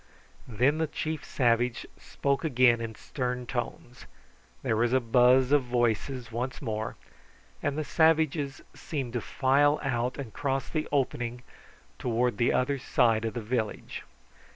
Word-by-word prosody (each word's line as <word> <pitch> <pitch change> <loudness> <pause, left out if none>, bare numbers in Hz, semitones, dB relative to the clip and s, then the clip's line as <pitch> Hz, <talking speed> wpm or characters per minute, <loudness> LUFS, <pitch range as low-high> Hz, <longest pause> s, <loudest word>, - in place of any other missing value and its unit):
Then 125 +7 +2
the 160 - +1
chief 155 0 -4
savage 120 -1 +1
spoke 140 +2 -2
again 125 -6 +4
in 115 -1 -5
stern 125 0 -4
tones, 120 0 -5 0.6
there 110 - +1
was 120 +2 +1
a 130 - +5
buzz 125 +2 +4
of 145 -3 +4
voices 120 +1 -1
once 125 +3 -3
more, 110 -4 -3 0.7
and 145 0 -1
the 155 - -1
savages 155 -3 +2
seemed 135 -7 -5
to 120 - -1
file 145 +5 +2
out 125 -2 -1
and 135 -6 -7
cross 135 -1 -1
the 155 -1 -2
opening 125 -3 -1 0.6
towards 120 0 0
the 120 - +3
other 135 +2 +1
side 115 -3 +2
of 115 - -3
the 120 - -2
village. 110 -1 -3
125 Hz, 145 wpm, -28 LUFS, 120-140 Hz, 0.7 s, a